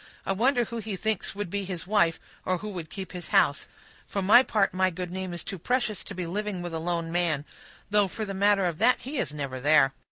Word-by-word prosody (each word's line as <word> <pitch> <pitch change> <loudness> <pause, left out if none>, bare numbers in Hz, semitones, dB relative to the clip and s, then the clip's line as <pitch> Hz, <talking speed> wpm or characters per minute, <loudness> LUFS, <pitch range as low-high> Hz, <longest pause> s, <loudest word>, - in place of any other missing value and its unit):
I - - 0
wonder 245 +5 +3
who 235 - -6
he 215 -2 -4
thinks 215 0 -2
would 205 -4 -4
be 200 0 -1
his 185 -3 -5
wife, 180 -5 +2 0.2
or 185 - 0
who 210 +4 -6
would 175 -6 -6
keep 190 -2 -7
his 180 -2 -6
house, 145 - +3 0.4
For 200 - -2
my 210 +6 +8
part, 210 -6 +1
my 185 0 +2
good 180 0 -5
name 185 0 -4
is 175 - -4
too 195 -4 -6
precious 235 +1 0
to 195 - -7
be 180 -1 -3
living 195 +1 -3
with 175 -1 -5
a 160 - -2
lone 170 0 -2
man; 165 -4 +1 0.5
though, 205 -1 +4
for 215 +4 -5
the 200 - -5
matter 200 0 +3
of 170 -3 -2
that, 250 - +4
he 275 +1 -4
is - - -1
never 140 -3 -4
there. 140 -1 +4
185 Hz, 245 wpm, -27 LUFS, 170-210 Hz, 0.5 s, my